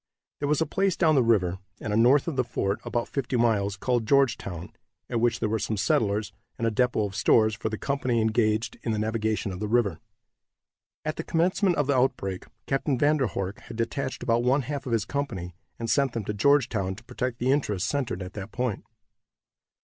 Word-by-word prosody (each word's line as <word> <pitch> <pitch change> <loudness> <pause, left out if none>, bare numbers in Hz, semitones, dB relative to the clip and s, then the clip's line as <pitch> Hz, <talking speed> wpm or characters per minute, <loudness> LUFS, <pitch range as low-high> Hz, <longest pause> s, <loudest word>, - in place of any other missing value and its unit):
There 145 - -1
was 150 0 +2
a - - +3
place 195 +1 0
down 160 -3 +4
the 135 - +5
river, 95 -6 +2 0.2
and 105 -1 -2
north 135 +6 +5
of 165 - -2
the 130 - +2
fort, 100 -4 -2
about 120 -1 -2
fifty 130 -2 -2
miles, 105 -4 +1
called 120 +1 0
Georgetown, 105 - +1 0.4
at 115 - 0
which 120 -1 +2
there 110 - 0
were 110 +1 0
some 110 +1 -2
settlers, 105 +1 +1 0.2
and 115 - -1
a 115 - +2
depot 125 -1 +1
of 100 -1 -6
stores 110 +1 +4
for 105 +1 -3
the 110 - -4
company 130 -3 0
engaged 110 0 +1
in 115 - -1
the - - -1
navigation 110 -1 -1
of 90 - -6
the 105 - -2
river. 105 -6 +1 1.1
At 155 0 -2
the 165 - -3
commencement 180 +3 +2
of 145 - +1
the 140 0 +1
outbreak 100 -7 0 0.2
Captain 135 0 0
Van 150 +4 +3
der 135 -4 +1
Horck 95 +1 -4
had 115 - -10
detached 130 +3 -2
about 115 0 +2
one 130 +3 +2
half 140 0 -4
of - - -3
his 115 -3 +1
company, 105 -11 -3 0.2
and 115 - -4
sent 135 +1 +2
them 115 -4 -3
to 105 - -2
Georgetown, 110 -5 +2
to 115 - -14
protect 125 0 -3
the 125 +2 +1
interests 105 -9 0
centered 125 -10 -2
at 90 +1 -9
that 100 0 -7
point. 125 -4 -2
115 Hz, 210 wpm, -26 LUFS, 105-135 Hz, 1.1 s, the